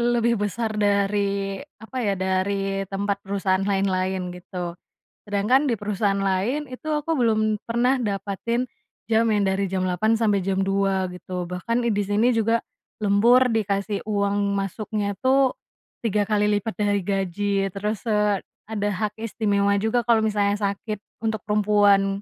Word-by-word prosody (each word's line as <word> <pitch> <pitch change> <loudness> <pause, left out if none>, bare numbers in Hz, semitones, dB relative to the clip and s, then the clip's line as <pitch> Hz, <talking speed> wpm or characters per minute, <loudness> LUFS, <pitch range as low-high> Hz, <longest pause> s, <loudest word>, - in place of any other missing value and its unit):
lebih 235 -1 +2
besar 220 +2 -1
dari 200 -1 +1 0.2
apa 255 +3 -5
ya, 205 -5 0
dari 195 +1 -1
tempat 200 +1 -2
perusahaan 195 -1 0
lain-lain 190 -2 0
gitu, 175 -1 -6 0.5
sedangkan 210 +8 +2
di 240 - +1
perusahaan 205 -1 0
lain 195 +10 0
itu 255 +5 -9
aku 300 +1 -1
belum 215 -4 +2
pernah 245 +3 +2
dapetin 210 +2 -2 0.5
jam 225 +1 +4
yang 205 -1 +2
dari 195 +1 0
jam 185 -1 0
8.00 215 +5 +2
sampai 210 -3 +2
jam 190 0 0
2.00 195 -1 +1
gitu, 180 0 -5
bahkan 230 +7 -2
i 235 - +1
di 205 0 +1
sini 215 +5 +3
juga 225 +1 +2 0.4
lembur, 235 +6 +5
dikasih 200 -1 -1
uang 200 -1 +1
masuknya 205 +1 -2
tuh 265 0 +4 0.5
3 210 -2 +1
kali 210 -1 +2
lipat 220 +2 -5
dari 205 -1 +2
gaji, 200 +1 -1 0.2
terus, 210 +1 -3
eee, 210 -2 +2 0.3
ada 205 -2 -1
hak 210 +2 -2
istimewa 200 -3 +1
juga 220 +3 +1
kalau 230 -1 +4
misalnya 205 -1 +1
sakit 205 +1 -2 0.2
untuk 220 -1 0
perempuan 205 -2 +3
205 Hz, 145 wpm, -24 LUFS, 195-220 Hz, 0.5 s, lembur